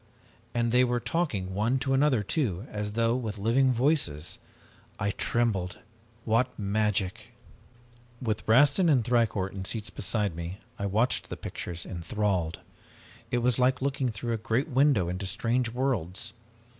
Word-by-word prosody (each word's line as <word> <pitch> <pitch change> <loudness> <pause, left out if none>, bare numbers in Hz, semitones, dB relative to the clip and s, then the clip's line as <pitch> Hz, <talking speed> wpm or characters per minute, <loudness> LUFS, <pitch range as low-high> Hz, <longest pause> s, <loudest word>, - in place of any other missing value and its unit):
And 120 -1 +1
they 125 +1 +5
were 120 -1 +1
talking 110 - -1
one 110 +7 +1
to 135 +1 0
another, 135 -5 +3
too, 105 - -1
as 105 0 -3
though 115 +1 +2
with 110 -5 -3
living 120 +6 +3
voices! 120 - +1 0.6
I 100 +1 0
trembled. 100 -6 0 0.5
What 120 +3 +1
magic! 105 +1 -1 0.9
"With 110 -3 -2
Rastin 145 - +5
and 130 -6 +4
Thicourt 115 -6 +1
in 95 -1 -5
seats 105 +2 -4
beside 105 -3 -1
me, 85 +3 -5 0.2
I 100 - -1
watched 110 +6 +1
the - - -5
pictures 85 -1 -5
enthralled. 90 -1 -2 0.7
It 120 -1 0
was 125 0 +2
like 130 +1 +3
looking 135 -1 0
through 115 +2 -3
a - - 0
great 115 +6 -1
window 130 - +3
into 90 +2 -3
strange 120 +4 0
worlds. 115 -8 -2
115 Hz, 145 wpm, -28 LUFS, 100-125 Hz, 0.9 s, they